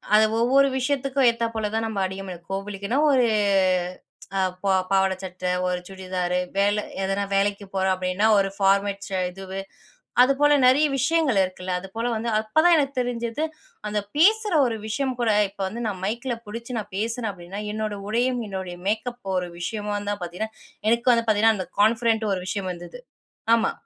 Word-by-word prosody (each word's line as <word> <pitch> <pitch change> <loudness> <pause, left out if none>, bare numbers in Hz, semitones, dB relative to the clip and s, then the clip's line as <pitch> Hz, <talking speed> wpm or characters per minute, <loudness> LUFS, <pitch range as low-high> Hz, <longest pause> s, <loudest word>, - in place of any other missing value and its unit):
அத 215 - +7 0.2
ஒவ்வொரு 270 +4 +4
விஷயத்துக்கும் 270 0 +1
ஏத்தாப் 230 0 -1
போல 220 -2 -2
தான் 225 0 0
நம்ம 215 -3 -3
அணிய, 190 +1 -5 0.3
கோவிலுக்குன்னா 200 +4 -3
ஒரு 255 -3 +4 1.1
அ - - +2 0.2
ப - - -6 0.2
பாவாடை 190 -1 +3
சட்டை, 185 -1 -3 0.2
ஒரு 180 0 -1
சுடிதார் 185 -2 -3 0.2
வேலை 205 +1 +2 0.2
எதனா 195 +1 0
வேலைக்கு 200 +1 +1
போறோம் 190 0 +2
அப்படின்னா 185 +2 0
ஒரு 195 -1 +2
ஃபார்மல்ஸ் 200 0 +1 0.2
இது, 190 +1 -7 0.6
அதுபோல 275 +3 +4
நிறைய 275 +4 +5
விஷயங்கள் 280 -4 +2
இருக்குல்ல 185 0 -3
அது 195 - -9
போல 230 +1 -1
வந்து 225 +2 -2
அப்போதான் 315 +11 +4
எனக்கு 280 -2 0
தெரிஞ்சது, 240 +2 -2 0.5
அந்த 210 0 0 0.2
பேசுகிற 425 +4 +4
ஒரு 225 -2 -2
விஷயம் 260 +4 -1
கூட, 230 -2 +3 0.2
இப்போ 195 0 -6
வந்து 230 +5 -5
நான் 195 -4 -4
மைக்கில 240 +4 -2
பிடிச்சு 235 +3 -5
நான் 210 -2 -8
பேசுறேன் 225 +1 -2
அப்படின்னா 180 +2 -8
என்னோட 215 -1 -2
உடையும் 245 +2 +1
என்னுடைய 190 -2 -5
மேக்கப் 220 -1 -2
ஒரு 180 -1 -2
விஷயமா 210 +3 -3 0.2
தான் 205 -2 -4
பார்த்தீங்கன்னா 180 +6 -5 0.4
எனக்கு 235 +2 +3
வந்து 230 -1 +1
பார்த்தீங்கன்னா 220 0 +4
அந்த 185 - -4
கான்ஃபிடென்ட் 220 0 +2
ஒரு 185 - -2
விஷயம் 195 -1 -2
வந்தது. 175 - -10 0.6
ஆமா. 225 -1 +1
215 Hz, 160 wpm, -24 LUFS, 195-240 Hz, 1.1 s, அத